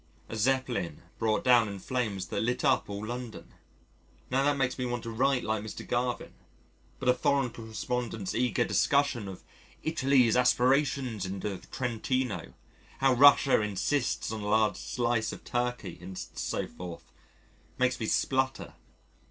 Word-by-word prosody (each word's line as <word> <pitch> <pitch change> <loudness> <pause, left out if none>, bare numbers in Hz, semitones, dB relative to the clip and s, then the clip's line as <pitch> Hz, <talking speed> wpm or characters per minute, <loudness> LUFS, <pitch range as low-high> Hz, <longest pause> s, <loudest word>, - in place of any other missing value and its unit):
A - - -5
Zeppelin 115 - 0 0.2
brought 110 -1 +1
down 120 -3 +5
in 100 - -6
flames 105 -3 -2
that - - -1
lit 125 +2 0
up - - +2
all 100 +1 -4
London 120 0 -7 0.8
now 135 +2 +2
that 145 0 +2
makes 125 -1 0
me - - 0
want 120 -1 -3
to 115 - -5
write 125 +3 +1
like 110 -1 -1
Mr. 110 - -7
Garvin. 120 0 -1 0.6
But 130 - -5
a 125 - +7
Foreign 135 -1 +1
Correspondent's 115 -2 -4
eager 125 +1 +1
discussion 140 -7 +2
of 95 -1 -9 0.4
"Italy's 135 -7 +3
aspirations 125 -2 +2
in 95 +1 -4
the 100 -2 -4
Trentino," 125 - -2 0.4
how 135 -1 +4
Russia 140 -1 +6
insists 105 +6 -1
on 110 -1 -4
a 105 - -4
large 110 0 +3
slice 120 -2 -1
of - - -9
Turkey, 125 -5 -3
and 90 +1 -8
so - - -3
forth, 90 -2 -9 0.7
makes 130 0 +1
me 110 - -2
splutter. 130 +2 0
120 Hz, 150 wpm, -29 LUFS, 110-130 Hz, 0.8 s, a